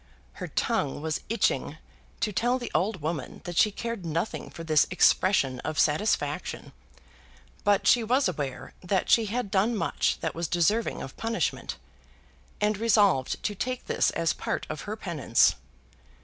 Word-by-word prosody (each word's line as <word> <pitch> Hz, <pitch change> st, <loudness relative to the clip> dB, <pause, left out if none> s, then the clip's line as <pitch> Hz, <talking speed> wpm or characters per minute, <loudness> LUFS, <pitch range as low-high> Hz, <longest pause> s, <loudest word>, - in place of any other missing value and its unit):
Her -, -, -3 dB
tongue 140 Hz, -, -1 dB
was 160 Hz, -1 st, -2 dB
itching 225 Hz, -2 st, 0 dB, 0.4 s
to 210 Hz, -, 0 dB
tell 245 Hz, +5 st, +1 dB
the 245 Hz, -, -6 dB
old 190 Hz, -3 st, 0 dB
woman 155 Hz, -2 st, -4 dB
that 175 Hz, -1 st, -6 dB
she 210 Hz, -, +5 dB
cared 230 Hz, -1 st, -5 dB
nothing 165 Hz, +5 st, -3 dB
for 165 Hz, -, -9 dB
this 155 Hz, -2 st, +3 dB
expression 180 Hz, -7 st, +3 dB
of 155 Hz, -1 st, -4 dB
satisfaction; 150 Hz, -2 st, 0 dB, 0.9 s
but 205 Hz, -1 st, +3 dB
she 240 Hz, -, +5 dB
was 255 Hz, +4 st, +2 dB
aware 145 Hz, -7 st, -4 dB
that 185 Hz, +1 st, 0 dB
she 225 Hz, -2 st, +5 dB
had 230 Hz, -1 st, -3 dB
done 210 Hz, +5 st, +2 dB
much -, -, 0 dB
that -, -, -2 dB
was 170 Hz, 0 st, -3 dB
deserving 190 Hz, +8 st, +1 dB
of 135 Hz, -, -9 dB
punishment, 230 Hz, 0 st, -2 dB, 0.8 s
and 210 Hz, -1 st, +1 dB
resolved 205 Hz, -, +2 dB
to 210 Hz, -, -1 dB
take 255 Hz, +5 st, -4 dB
this -, -, +2 dB
as 165 Hz, -1 st, 0 dB
part -, -, -3 dB
of 155 Hz, -, -5 dB
her 215 Hz, -, -2 dB
penance. 170 Hz, -, +2 dB
190 Hz, 155 wpm, -27 LUFS, 160-220 Hz, 0.9 s, she